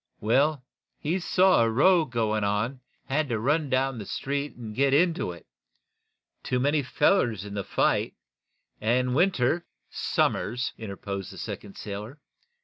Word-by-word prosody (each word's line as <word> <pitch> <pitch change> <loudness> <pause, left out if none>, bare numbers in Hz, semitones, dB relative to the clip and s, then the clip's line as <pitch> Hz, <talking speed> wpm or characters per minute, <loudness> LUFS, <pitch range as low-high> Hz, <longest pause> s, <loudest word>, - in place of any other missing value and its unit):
"Well, 135 +6 +2 0.3
he 170 +6 -1
saw 185 -3 +4
a 115 - +3
row 160 +8 +4
going 110 -4 -1
on, 105 +3 +1
and 135 - -17 0.3
he 135 - -5
had 155 0 +1
to 115 - 0
run 145 +5 +1
down 130 -1 0
the 100 - -7
street 140 +1 -3
and 115 -3 -8
get 140 +1 +3
into 165 - +2
it. 85 -1 -12 1.0
Too 125 - -1
many 145 +3 +2
fellers 125 - +1
in 100 - -7
the 100 -1 -3
fight, - - +1 0.6
and 125 +3 +1
Winter 170 0 +2 0.2
" - - -47 0.3
"Somers," 125 +4 +1
interposed 100 -3 -6
the - - -11
second 100 - -7
sailor. 105 +7 -7
125 Hz, 155 wpm, -27 LUFS, 110-150 Hz, 1.0 s, saw